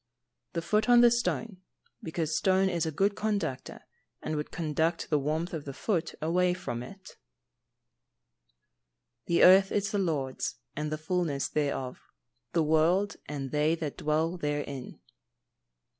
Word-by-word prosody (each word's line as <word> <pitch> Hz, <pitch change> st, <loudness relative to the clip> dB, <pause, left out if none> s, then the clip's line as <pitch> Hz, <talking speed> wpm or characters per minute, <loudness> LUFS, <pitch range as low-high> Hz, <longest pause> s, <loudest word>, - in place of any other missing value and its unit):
_ -, -, -48 dB
The 170 Hz, -1 st, -2 dB
foot 210 Hz, +7 st, +1 dB
on 240 Hz, 0 st, +8 dB
the 240 Hz, -1 st, +7 dB
stone, 230 Hz, -3 st, -1 dB, 0.4 s
because 160 Hz, -1 st, -2 dB
stone 190 Hz, 0 st, +3 dB
is 170 Hz, -3 st, -1 dB
a -, -, -1 dB
good 195 Hz, +6 st, +1 dB
conductor, 200 Hz, -11 st, -3 dB, 0.4 s
and 155 Hz, -, -2 dB
would 150 Hz, 0 st, -3 dB
conduct 165 Hz, +1 st, -1 dB
the 150 Hz, -, +3 dB
warmth 155 Hz, +5 st, -2 dB
of 160 Hz, -3 st, -4 dB
the 140 Hz, -2 st, -7 dB
foot 170 Hz, -6 st, -1 dB
away 180 Hz, +2 st, +2 dB
from 120 Hz, -9 st, -5 dB
it. 190 Hz, +10 st, -11 dB
[Verse: -, -, -16 dB, 2.1 s
"The 170 Hz, -, +3 dB
earth 190 Hz, +1 st, +7 dB
is 205 Hz, +1 st, 0 dB
the 205 Hz, -, 0 dB
Lord's, 145 Hz, -8 st, -2 dB, 0.2 s
and 150 Hz, +1 st, -3 dB
the 155 Hz, -, -1 dB
fulness 155 Hz, -3 st, -1 dB
thereof; 140 Hz, -4 st, -2 dB, 0.5 s
the 165 Hz, -, +3 dB
world, 165 Hz, +6 st, +2 dB
and 140 Hz, -2 st, -5 dB
they 150 Hz, +2 st, +2 dB
that 155 Hz, -4 st, -5 dB
dwell 160 Hz, +3 st, 0 dB
therein." 145 Hz, -4 st, -4 dB
165 Hz, 150 wpm, -29 LUFS, 150-190 Hz, 2.1 s, on